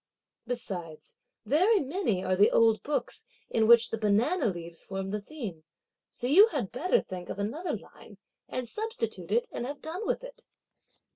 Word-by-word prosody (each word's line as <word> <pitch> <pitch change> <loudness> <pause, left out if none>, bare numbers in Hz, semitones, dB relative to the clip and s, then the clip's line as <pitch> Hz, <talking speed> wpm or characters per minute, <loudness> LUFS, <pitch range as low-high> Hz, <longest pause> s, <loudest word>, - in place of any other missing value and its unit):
Besides, 180 -10 -5 0.3
very 370 - +4
many 275 - -1
are 185 - +1
the 200 +3 +6
old 225 -1 +4
books, 300 - -3 0.2
in 220 -1 +3
which 235 0 +7
the 225 - -2
banana 225 - +2
leaves 170 -3 -4
form 195 0 -4
the 210 0 -2
theme, 205 - -7 0.5
so - - -6
you 360 - +8
had 195 - -3
better 365 - +2
think 180 -2 -8
of - - -4
another 230 - -2
line - - -16 0.3
and 255 -1 -4
substitute 445 - -4
it 480 0 +2
and 240 - -4
have 285 +1 -6
done 350 +7 -5
with - - -1
it!" - - -11
240 Hz, 165 wpm, -29 LUFS, -, 0.5 s, you